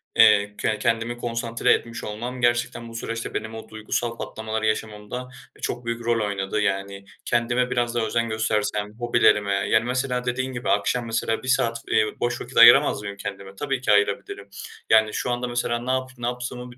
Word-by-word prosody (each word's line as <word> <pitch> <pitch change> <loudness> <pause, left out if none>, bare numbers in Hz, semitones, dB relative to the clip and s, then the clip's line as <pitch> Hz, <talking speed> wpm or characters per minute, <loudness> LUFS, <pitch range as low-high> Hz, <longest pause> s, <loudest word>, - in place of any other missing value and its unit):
eee, 105 -2 +5
ke 110 -1 0
kendimi 115 +2 0
konsantre 115 0 +1
etmiş 115 0 -3
olmam 120 +4 -5
gerçekten 120 -1 0
bu 115 - -11
süreçte 115 0 -4
benim 110 0 -4
o 110 - -9
duygusal 115 +2 -3
patlamaları 110 0 -4
yaşamamda, 110 +3 -3 0.3
e, - - -19
çok 120 0 -3
büyük 115 0 -3
rol 115 -2 +1
oynadı. 100 +1 -2
Yani 100 0 -2 0.2
kendime 120 +1 +1
biraz 120 -1 0
daha 115 -2 +1
özen 115 +1 0
göstersem, 105 -1 -1
hobilerime 110 -4 +3
yani 110 +3 +2
mesela 125 0 -1
dediğin 130 +1 -2
gibi 125 +1 -4
akşam 125 -1 +1
mesela 115 0 -1
1 - - -7
saat, 115 -3 +1
eee, 110 - +4
boş 120 0 -1
vakit 125 +2 -8
ayıramaz 120 +2 +8
mıyım 100 -1 -6
kendime? 100 -1 -7
Tabii 135 +1 -2
ki 115 - +1
ayırabilirim. 100 -1 0 0.4
Yani, 110 -1 +5
şu 125 - -2
anda 120 +1 -2
mesela 120 -1 -1
ne 125 +2 -2
yap 130 0 -1
ne 120 0 -3
yaptığımı 125 0 -5
bir 120 - -16
115 Hz, 185 wpm, -24 LUFS, 105-120 Hz, 0.4 s, ayıramaz